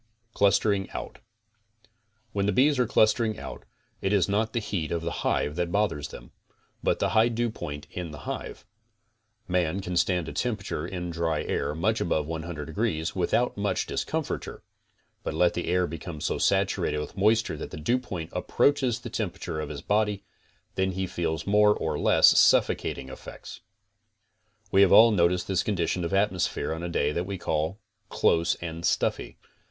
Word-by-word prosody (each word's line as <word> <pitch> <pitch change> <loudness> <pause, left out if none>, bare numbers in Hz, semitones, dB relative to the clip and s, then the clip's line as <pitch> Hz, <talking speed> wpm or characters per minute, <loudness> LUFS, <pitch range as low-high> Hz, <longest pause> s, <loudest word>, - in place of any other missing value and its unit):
CLUSTERING 100 -1 +2
OUT - - -6 1.1
When 100 0 0
the - - +3
bees 140 +3 +3
are 125 - +3
clustering 110 0 +2
out, - - -8 0.4
it 95 - 0
is 100 -4 +3
not 105 +2 0
the 120 - +1
heat 95 -7 -3
of 85 -1 -1
the 85 - -2
hive 75 - 0
that 85 -1 -1
bothers 95 -8 0
them, - - -12 0.5
but - - +1
the - - 0
high 110 0 +4
dewpoint 110 -11 -3
in 90 -2 -5
the 75 -1 -9
hive. - - -6 0.8
Man 90 0 0
can 90 -2 -4
stand 90 -1 +1
a - - -6
temperature 105 -9 -2
in 90 -2 -4
dry 80 -2 -1
air 75 - -2
much 110 +7 0
above 80 -3 0
100 80 -1 -5
degrees 80 -1 -2
without 95 +7 +1
much 100 -2 0
discomforture, - - -3 0.6
but 80 - -4
let 85 +1 +3
the 85 - -3
air 90 +1 +2
become 85 -2 -7
so - - -2
saturated - - +1
with 75 - -5
moisture 110 +3 +2
that - - -6
the - - -8
dewpoint 90 -2 -2
approaches 130 -5 +1
the - - -6
temperature 80 - -3
of 75 - -4
his 70 -2 -7
body, 105 -1 +1 0.5
then 95 0 0
he 95 +1 -2
feels 80 -3 -3
more 105 +1 +4
or - - -2
less - - +6
sufficating 65 - +2
effects. - - -10 1.1
We 95 - +5
have 100 - +6
all 115 +3 +8
noticed 90 -2 +2
this 95 -2 +1
condition 90 -3 -1
of 85 - -2
atmosphere 95 -4 0
on 80 - -5
a 85 - -3
day 75 -3 +1
that 85 +4 -2
we 100 -1 -4
call 80 +2 -1 0.3
close 85 0 +2
and 85 -1 -7
stuffy. - - 0
90 Hz, 170 wpm, -27 LUFS, 80-105 Hz, 1.1 s, all